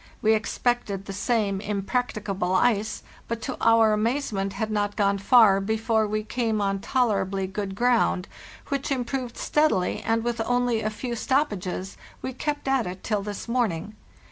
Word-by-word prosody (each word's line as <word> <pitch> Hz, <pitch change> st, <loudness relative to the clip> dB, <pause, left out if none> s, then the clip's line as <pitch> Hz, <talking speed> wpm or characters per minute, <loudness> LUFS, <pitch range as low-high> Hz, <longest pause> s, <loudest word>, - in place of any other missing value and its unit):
We 220 Hz, 0 st, +5 dB
expected 220 Hz, -2 st, -1 dB
the 195 Hz, -, -6 dB
same 205 Hz, -2 st, 0 dB
impracticable 200 Hz, -3 st, -1 dB
ice, 215 Hz, +1 st, +1 dB, 0.2 s
but, 230 Hz, 0 st, -3 dB
to 260 Hz, -, -3 dB
our 225 Hz, -1 st, +5 dB
amazement, 215 Hz, -3 st, -1 dB
had 220 Hz, +1 st, -3 dB
not 205 Hz, -1 st, 0 dB
gone 200 Hz, -1 st, +2 dB
far 205 Hz, -2 st, +6 dB
before 220 Hz, +1 st, +1 dB
we 215 Hz, +1 st, -1 dB
came 225 Hz, -1 st, -1 dB
on 195 Hz, -1 st, 0 dB
tolerably 195 Hz, -6 st, 0 dB
good 195 Hz, 0 st, -4 dB
ground, 235 Hz, -5 st, +2 dB, 0.4 s
which 280 Hz, -1 st, -2 dB
improved 250 Hz, -1 st, -2 dB
steadily, 300 Hz, -12 st, +1 dB
and, 225 Hz, 0 st, 0 dB
with 235 Hz, -1 st, -1 dB
only 245 Hz, -1 st, +1 dB
a 215 Hz, -, 0 dB
few 235 Hz, +3 st, -4 dB
stoppages, 205 Hz, -8 st, -1 dB, 0.3 s
we 260 Hz, -, -3 dB
kept 295 Hz, +2 st, -3 dB
at 270 Hz, -5 st, +2 dB
it 185 Hz, +1 st, -7 dB
till 210 Hz, -2 st, 0 dB
this 205 Hz, +2 st, -6 dB
morning. 215 Hz, -5 st, -1 dB
220 Hz, 155 wpm, -25 LUFS, 200-245 Hz, 0.4 s, far